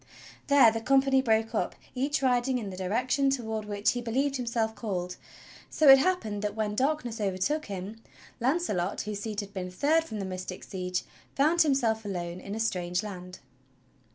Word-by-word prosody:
There 280 -5 +7
the 225 0 -3
company 270 +2 +3
broke 225 -2 +1
up, 220 - -1 0.2
each 275 +2 -1
riding 250 0 +2
in 210 -5 -5
the - - -7
direction 245 +9 +1
toward 220 -5 -2
which 205 0 +1
he 245 - -3
believed 265 +4 0
himself 230 -3 -1
called; 180 -6 -4 0.5
so 310 - +2
it 270 0 +10
happened 265 - 0
that, 210 0 -2
when 215 -1 -1
darkness 255 -2 -1
overtook 205 +11 -1
him, 200 +3 -6 0.4
Launcelot, 235 - 0
whose 210 -1 -4
seat 210 0 -3
had 200 0 -10
been 185 -2 -4
third 295 - +2
from 220 -9 -7
the 195 - -3
mystic 185 0 -6
Siege, 180 -1 -3 0.3
found 315 +5 +3
himself 240 -7 +2
alone 175 -3 -4
in 200 +2 -6
a - - -4
strange 180 -4 -1
land. 180 -3 -8
220 Hz, 175 wpm, -28 LUFS, 195-265 Hz, 0.5 s, it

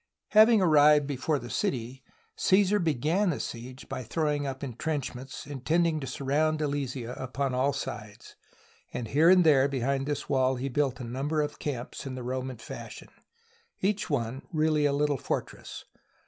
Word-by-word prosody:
Having 215 -1 +6
arrived 150 -3 +6
before 145 +2 -1
the 120 -3 -8
city, 125 +1 -2 0.3
Caesar 200 +1 +3
began 165 +5 +1
the 160 - -1
siege 125 +2 -7
by - - -4
throwing 145 +3 -1
up 135 0 -5
intrenchments, 135 0 -4
intending 155 +4 0
to 135 - -6
surround 145 +4 0
Alesia 135 -5 -3
upon 130 +1 -2
all 130 +3 +2
sides, 105 -6 -7 0.6
and 115 -2 -5
here 155 +4 +5
and 185 -1 +7
there 140 -4 +5
behind 135 0 -1
this 145 -1 -3
wall 130 -2 +2
he 130 +2 -3
built 135 -1 0
a - - -5
number 135 +6 -2
of 150 - -5
camps 135 -1 -5
in 130 - -5
the 125 - -6
Roman 130 0 -4
fashion, 115 - -9 0.7
each 200 0 0
one 130 -2 -2
really 155 -2 +2
a - - +1
little 145 0 +1
fortress. - - -5
140 Hz, 160 wpm, -28 LUFS, 130-155 Hz, 0.7 s, and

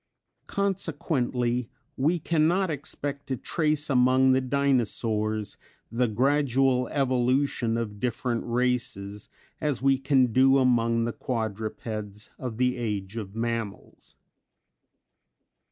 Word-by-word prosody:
Consequently 135 - -1 0.3
we 155 +7 +2
cannot 170 +3 +1
expect 145 0 -5
to 130 -2 -2
trace 155 0 0
among 130 0 +4
the 130 0 +3
Dinosaurs, 115 -6 0 0.3
the 125 +1 +1
gradual 130 +1 +2
evolution 130 -2 +1
of 105 -3 -4
different 120 +1 -1
races, 120 -5 -2 0.3
as 150 -5 0
we 135 -1 +4
can 135 -4 +2
do 135 +2 +5
among 115 -3 +2
the 120 - -2
quadrupeds 110 -2 -4
of 125 -4 -5
the 125 0 +1
Age 105 -4 -3
of 105 -3 -6
Mammals. 115 -3 -5
125 Hz, 105 wpm, -27 LUFS, 115-135 Hz, 0.3 s, do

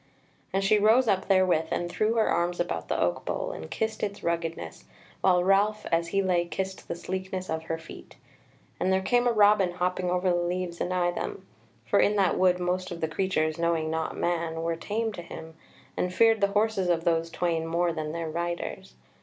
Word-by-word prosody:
And 195 +1 0
she 210 +2 +4
rose 225 +4 +4
up 190 -3 +1
therewith 185 -4 +3
and 175 - -1
threw 215 +5 0
her 225 - +3
arms 175 +1 0
about 175 - -2
the - - -1
oak 85 - 0
bole - - -3
and 80 0 -8
kissed 220 0 -2
its 200 -1 -3
ruggedness, 165 - -3 0.4
while 180 -2 +4
Ralph 200 +3 +2
as 170 0 +2
he 195 +3 0
lay 175 -2 +2
kissed 190 +2 -5
the - - -3
sleekness 185 +1 -4
of 160 0 -3
her 165 - -2
feet. 165 - -12 0.6
And 190 - +1
there 190 0 +2
came 245 +4 +2
a - - +4
robin 205 -4 +4
hopping 180 0 -1
over 180 +1 0
the - - +2
leaves 175 0 -2
anigh 180 -1 +1
them, 405 - -5 0.4
for - - +2
in 210 - +3
that 195 -3 +2
wood 180 -1 +4
most 180 +1 -2
of 175 -2 -6
the 160 - 0
creatures, 155 -2 -1
knowing 165 -2 0
not 160 0 -2
man, 165 -1 -1
were 165 0 0
tame 220 +6 -2
to 175 - -7
him, 160 -1 -10 0.4
and 180 - -1
feared 225 +2 +4
the 200 - +5
horses 210 -4 +1
of 165 -1 +1
those 165 -1 +1
twain 165 -2 -1
more 170 +1 +1
than 155 -1 -4
their 165 0 -4
riders. 170 - -4
180 Hz, 205 wpm, -27 LUFS, 165-195 Hz, 0.6 s, the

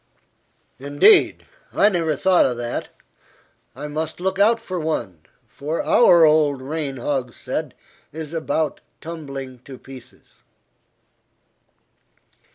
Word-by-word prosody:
"Indeed! 145 - +4 0.3
I 205 - +4
never 165 -5 0
thought 185 +5 +4
of 125 - -3
that. 120 0 -4 0.9
I 145 +3 -6
must 155 +2 -4
look 190 +2 -2
out 225 +3 +4
for 185 -5 -5
one, 120 - -3 0.3
for 150 +4 -4
our 175 -8 +6
old 150 -3 +3
rain 140 0 -4
hogshead 130 -1 -3 0.4
is 155 +1 -7
about 160 -1 -2 0.2
tumbling 140 -6 -8
to 130 +1 -12
pieces." 130 -2 -15
150 Hz, 105 wpm, -21 LUFS, 135-170 Hz, 0.9 s, our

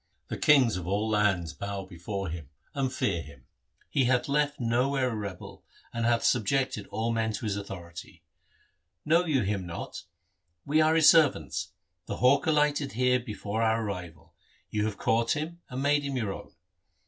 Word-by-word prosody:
The - - -3
kings 130 -9 +5
of 90 -2 -6
all 100 +3 0
lands 100 -7 +1
bow 100 +2 -5
before 95 +2 -5
him, 80 -4 -7 0.2
and 135 -2 -1
fear 85 -9 -1
him. 70 -4 -14 0.4
He 135 - +1
hath 125 -1 +2
left 145 +1 0
nowhere 125 +2 +1
a - - -3
rebel, 100 -4 -7 0.3
and 115 0 0
hath 120 -1 +2
subjected 125 -1 +1
all 115 +1 -2
men 110 -1 0
to 105 - -5
his 105 -2 -1
authority. 85 -4 -8 0.8
Know 165 +4 +4
you 140 -8 +1
him 95 -2 -2
not? 85 +1 -7 0.6
We 155 +2 +3
are 155 +1 +4
his 160 -2 +6
servants. 145 - +3 0.3
The - - -4
hawk 130 +5 +4
alighted 150 -2 +2
here 125 +2 +3
before 110 -2 -4
our 115 0 +2
arrival. 90 -6 -7 0.4
You 105 0 0
have 105 -2 -3
caught 115 +3 +2
him, 165 +3 -5
and 130 +2 -4
made 145 +1 +3
him 140 -2 -3
your 110 -5 -1
own. - - -11
115 Hz, 170 wpm, -28 LUFS, 100-140 Hz, 0.8 s, his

